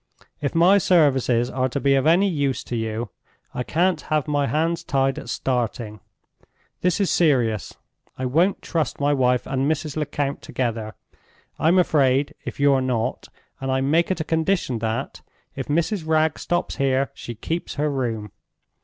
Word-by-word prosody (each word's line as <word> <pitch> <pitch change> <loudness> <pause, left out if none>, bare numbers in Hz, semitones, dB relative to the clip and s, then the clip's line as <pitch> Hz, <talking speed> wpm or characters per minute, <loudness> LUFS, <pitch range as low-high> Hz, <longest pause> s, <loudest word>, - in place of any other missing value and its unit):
If 140 +1 -2
my 180 +5 +6
services 130 -9 +3
are 130 0 0
to 135 - -2
be 140 0 +3
of 135 +2 +2
any 180 +5 +5
use 145 -7 -1
to 120 - -5
you, 110 +1 -3 0.4
I - - -3
can't 170 +6 +1
have 155 -1 -1
my 145 -1 +1
hands 165 +3 0
tied 135 -1 0
at - - -9
starting. 120 -4 -2 0.8
This 180 +1 +1
is 200 - +1
serious. 120 - +1 0.4
I 130 - -3
won't 165 +10 +1
trust 160 -6 -2
my 145 +1 +2
wife 125 -2 +2
and 135 +1 0
Mrs. 155 -1 -3
Lecount 145 -2 -2
together. 115 -4 -3 0.6
I'm 165 +4 +4
afraid, 140 -5 +3
if - - -6
you're 140 -2 +4
not, 125 -3 -2 0.3
and 135 0 -2
I 130 0 +1
make 160 +5 +2
it 185 - -1
a - - 0
condition 160 -6 0
that, 110 0 -3 0.3
if - - -5
Mrs. 165 +3 0
Wragge 160 0 +2
stops 175 0 -2
here, 135 0 +1
she 120 - -8
keeps 165 +10 -4
her 150 0 0
room. 115 -6 -3
140 Hz, 165 wpm, -23 LUFS, 125-160 Hz, 0.8 s, my